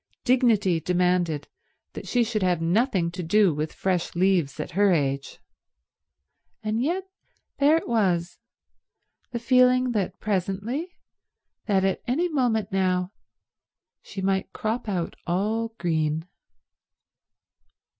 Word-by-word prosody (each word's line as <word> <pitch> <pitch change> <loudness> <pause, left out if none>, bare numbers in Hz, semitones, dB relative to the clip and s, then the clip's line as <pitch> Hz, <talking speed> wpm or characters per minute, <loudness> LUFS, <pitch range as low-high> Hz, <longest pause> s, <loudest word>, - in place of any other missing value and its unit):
Dignity 230 -9 +3
demanded 180 -3 0 0.5
that - - -8
she 245 -1 +2
should 220 -2 -2
have 180 -2 +2
nothing 175 0 +1
to 180 +1 -5
do 185 +1 +3
with 150 +1 -3
fresh 180 -3 -2
leaves 175 -6 +1
at - - -4
her 200 +3 +3
age; 140 -4 -1 1.3
and 215 +2 -1
yet 345 +8 0 0.6
there 295 +3 +5
it - - -4
was—the 185 -7 0 1.0
feeling 255 +1 +4
that 205 -5 -2
presently, 210 - -2 0.8
that 195 -3 +2
at 190 - 0
any 305 +9 +1
moment 235 - 0
now, 185 -1 0 0.9
she 190 - -7
might 190 0 0
crop 220 +1 -3
out 180 -4 -2
all 220 +6 -1
green. 160 -1 -1
195 Hz, 115 wpm, -25 LUFS, 175-230 Hz, 1.3 s, there